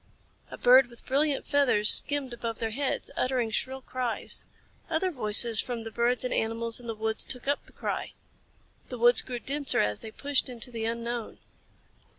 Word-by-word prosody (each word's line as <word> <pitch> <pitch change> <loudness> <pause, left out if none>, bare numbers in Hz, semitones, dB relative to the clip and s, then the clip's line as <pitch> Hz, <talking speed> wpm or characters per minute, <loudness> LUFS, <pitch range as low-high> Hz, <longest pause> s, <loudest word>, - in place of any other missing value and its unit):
A - - -9
bird 255 +1 +5
with 235 -1 -15
brilliant 285 +1 0
feathers 250 -7 +4
skimmed 285 -4 +3
above 230 -1 -5
their 225 -2 -4
heads, 275 +4 -3
uttering 250 -3 -1
shrill 265 +4 -3
cries. 250 -3 -3 0.4
Other 340 +3 -1
voices 225 - +5
from 240 -2 -6
the 225 - -8
birds 235 +1 0
and 250 - -2
animals 230 +1 -2
in 240 - -12
the 225 - -4
woods 220 +1 -2
took 250 +1 -4
up 285 0 -2
the - - -17
cry. - - -5 0.8
The 250 - -6
woods 240 0 +6
grew 250 - -6
denser 280 +3 +1
as 105 0 0
they 220 - -9
pushed 280 +4 -1
into 245 0 -7
the 225 -2 -4
unknown. 235 0 -4
240 Hz, 175 wpm, -27 LUFS, 225-265 Hz, 0.8 s, woods